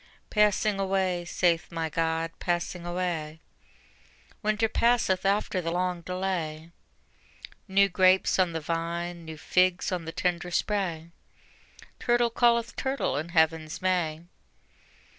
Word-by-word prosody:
Passing 210 -1 +2
away, 190 -2 0
saith 170 -1 +1
my 165 -1 -2
God, 165 +1 -1
passing 175 0 -2
away: 170 -3 -3 1.0
Winter 215 0 +1
passeth 220 -5 +2
after 200 -2 +1
the 165 - -3
long 180 0 -1
delay: 170 -3 -3 1.0
New 200 0 +4
grapes 185 0 +3
on 180 -2 +3
the 165 - -2
vine, 170 +2 -3
new 160 -1 -8
figs 180 +4 +2
on 180 -3 -3
the 165 - -5
tender 180 0 -1
spray, 175 -4 -1 0.9
Turtle 240 -1 +2
calleth 235 0 +2
turtle 270 +1 -1
in 155 +4 -3
Heaven's 160 -1 +1
May. 175 -4 0
180 Hz, 120 wpm, -27 LUFS, 165-195 Hz, 1.0 s, New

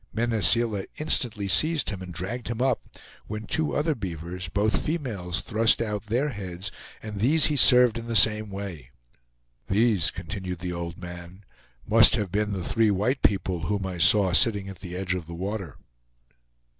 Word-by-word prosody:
Mene 115 -1 -1
Seela 110 -3 +3
instantly 115 -9 -1
seized 150 - +3
him 95 -2 -7
and 90 -1 -8
dragged 95 +8 -5
him 120 -1 -4
up, 130 -1 +1 0.5
when 105 +1 -6
two 155 +7 -1
other 155 +2 0
beavers, 90 - -6
both 100 +2 0
females, 105 - -3
thrust 110 0 +2
out 105 -2 -4
their 125 +7 0
heads, 95 -4 -6 0.3
and 105 -2 -7
these 145 +8 +4
he - - -1
served 125 -3 +6
in 115 - -9
the 115 - -3
same 110 -1 +5
way. 95 -10 -8 0.8
"These," 100 -6 +2
continued 90 +1 -6
the 90 +1 -5
old 85 0 -6
man, 90 +2 -11 0.4
"must - - +6
have 100 -4 -3
been 105 +1 -1
the 95 -3 -4
three 115 +4 +1
white 105 +7 0
people 90 -5 0
whom 100 0 -2
I 90 -2 -6
saw 95 +1 +4
sitting 100 -1 +2
at 95 -3 -10
the 90 -2 -8
edge 90 0 -2
of 90 -4 -5
the 85 - -8
water." 95 - -5
100 Hz, 175 wpm, -25 LUFS, 90-115 Hz, 0.8 s, served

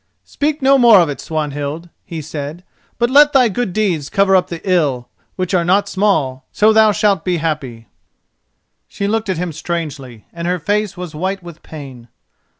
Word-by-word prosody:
"Speak 295 0 -2
no 270 +1 +5
more 235 -5 +7
of 170 -3 +2
it, 145 - -5
Swanhild," 150 +1 -4
he 160 -2 -7
said, 150 +3 -6 0.3
"but 240 0 +1
let 295 +2 +6
thy 255 -4 +5
good 225 0 -2
deeds 175 -8 -1
cover 195 -1 +3
up 185 - +3
the 170 - -6
ill, 145 -9 +1 0.3
which 185 0 -3
are 175 -2 +3
not 195 +4 +2
small; 185 -11 0
so 215 +1 +3
thou 220 -1 +5
shalt 205 -4 +1
be 180 -2 0
happy." 145 -8 -4 1.0
She 200 - -4
looked 220 0 -1
at 185 - -1
him 175 0 -3
strangely, 145 -8 -5
and 170 0 -5
her 180 +1 0
face 205 +3 -1
was 180 -3 -7
white 185 +4 -3
with 170 -2 -11
pain. 135 -6 -10
175 Hz, 180 wpm, -17 LUFS, 150-205 Hz, 1.0 s, more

